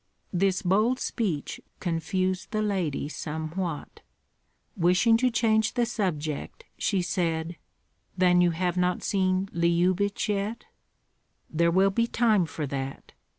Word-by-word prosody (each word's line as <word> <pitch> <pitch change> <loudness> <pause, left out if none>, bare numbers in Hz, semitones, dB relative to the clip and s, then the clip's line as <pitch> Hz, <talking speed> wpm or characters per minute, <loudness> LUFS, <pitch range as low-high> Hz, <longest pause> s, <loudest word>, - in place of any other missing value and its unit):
This 190 +1 +1
bold 215 +7 +2
speech 185 - -2 0.2
confused 185 +3 -1
the 215 -1 -1
lady 180 -9 -1
somewhat. 160 +2 -5 0.8
Wishing 180 +6 +4
to 255 +2 +2
change 225 -1 +2
the 240 -2 +2
subject, 155 -10 -3
she 195 -4 0
said, 170 -2 -1 0.6
"Then 180 -1 +4
you 175 - +4
have 175 +1 -1
not 180 0 +1
seen 185 -1 +1
Lyubich 175 +4 +1
yet?" 210 +2 -2 0.9
"There 170 +1 +2
will 190 +3 +4
be 230 +4 +1
time 220 -7 +2
for 155 -1 -4
that. 135 0 -5
185 Hz, 120 wpm, -27 LUFS, 170-205 Hz, 0.9 s, Wishing